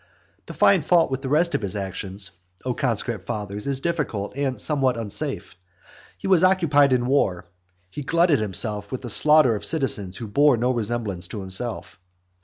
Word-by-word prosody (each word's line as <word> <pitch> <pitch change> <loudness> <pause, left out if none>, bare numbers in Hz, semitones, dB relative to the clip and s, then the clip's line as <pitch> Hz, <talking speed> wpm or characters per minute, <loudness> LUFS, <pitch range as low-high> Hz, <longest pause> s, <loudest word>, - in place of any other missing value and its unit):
To - - -8
find 190 -6 +4
fault 165 -2 +3
with 130 0 -2
the 135 - -4
rest 170 +4 +2
of - - 0
his 100 0 -3
actions, 95 0 -4 0.3
O 125 - 0
conscript 120 -6 -2
fathers, 105 +2 -5
is 135 -1 -1
difficult, 135 -11 -3
and 135 -2 -2
somewhat 135 -5 +1
unsafe. 105 -6 -3 0.6
He - - -11
was 185 -3 +4
occupied 160 -7 +4
in 125 -1 +2
war; 95 -10 0 0.5
he 145 - -6
glutted 165 +1 +2
himself 105 0 0
with 130 - -5
the 120 - -2
slaughter 150 -2 +4
of 105 - -6
citizens 105 - 0
who 115 - -6
bore 140 +5 +3
no 125 +3 +1
resemblance 110 -6 -2
to 105 - -6
himself. 95 +4 -5
125 Hz, 175 wpm, -23 LUFS, 105-145 Hz, 0.6 s, find